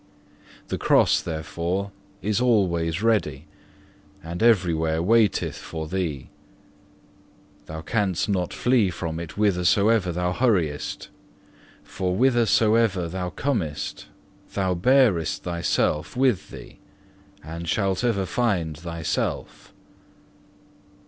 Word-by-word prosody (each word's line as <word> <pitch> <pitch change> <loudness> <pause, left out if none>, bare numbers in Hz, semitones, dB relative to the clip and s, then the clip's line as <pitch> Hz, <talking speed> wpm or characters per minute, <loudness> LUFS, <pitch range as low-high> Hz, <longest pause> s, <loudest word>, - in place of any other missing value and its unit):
The - - -3
Cross - - +4
therefore 85 +4 -3 0.3
is 105 +2 0
always 90 -7 +1
ready, 80 -11 +1 0.8
and 85 +2 -6
every 100 -7 +4
where 80 0 0
waiteth 105 +2 +2
for 80 -1 -6
thee. 80 -7 -3 1.4
Thou 80 0 -6
canst 100 -1 0
not 95 -4 -1
flee 120 -6 +2
from 85 -2 -4
it 85 -2 -7
whithersoever 100 0 +2
thou 90 +1 -1
hurriest, 90 - 0 0.7
for 90 -1 -3
whithersoever 115 -6 +3
thou 90 +1 -3
comest, 90 - -3 0.5
thou 95 -2 +1
bearest 100 - +2
thyself 85 +1 -1
with 125 -7 +1
thee, - - -12 0.6
and 85 +2 -6
shalt 95 0 0
ever 105 -6 +1
find 90 -9 -1
thyself. 85 0 -4
90 Hz, 100 wpm, -24 LUFS, 85-110 Hz, 1.4 s, Cross